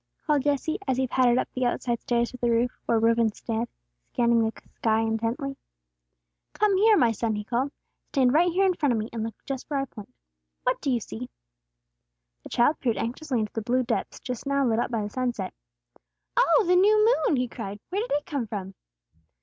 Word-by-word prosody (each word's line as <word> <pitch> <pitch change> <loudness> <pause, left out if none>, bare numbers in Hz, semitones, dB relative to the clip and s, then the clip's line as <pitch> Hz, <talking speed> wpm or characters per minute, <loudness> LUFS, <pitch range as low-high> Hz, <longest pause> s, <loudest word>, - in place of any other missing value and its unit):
called 295 -3 +2
Jesse, 290 +3 0
as 260 -1 +1
he 260 - +2
pattered 250 -1 +3
up - - +1
the 255 - -2
outside 240 -1 -1
stairs 235 -1 0
to 250 - -9
the 240 -1 0
roof, 235 +1 +2 0.2
where 230 - +3
Reuben 230 0 +3
stood, 225 +2 -3 0.4
scanning 235 -1 +3
the 220 - 0 0.3
sky 220 -1 +2
intently. 230 +5 -1 1.0
"Come 420 -2 +2
here, 430 +1 +5
my 235 -7 +4
son," 225 0 -1
he 210 - -3
called. 250 +6 -1 0.4
"Stand 260 -3 +3
right 345 +3 +4
here 385 +3 +3
in 375 - +3
front 290 -7 +1
of - - 0
me, 215 +1 -3
and 230 - -3
look 225 -1 -4
just 270 0 -5
where 285 -2 0
I 270 - -1
point. 220 -2 -12 0.5
What - - 0
do 280 - -1
you 245 -2 +2
see?" 245 +4 -7 1.1
The - - -11
child 285 +6 +2
peered 235 -4 0
anxiously 250 +1 -2
into 215 - -4
the 225 - -2
blue 250 +3 +1
depths - - -2
just 250 +1 -6
now 280 0 +2
lit 225 -2 +2
up - - 0
by 225 -3 -1
the 205 - -4
sunset. 240 -7 -2 0.8
"Oh, - - +5
the 360 +1 +4
new 425 +5 +5
moon!" - - +3
he 250 -1 0
cried. 210 -4 -7
"Where 395 +3 0
did 475 - -5
it 290 - 0
come 285 -10 -3
from?" 195 -3 -5
245 Hz, 210 wpm, -26 LUFS, 230-290 Hz, 1.1 s, here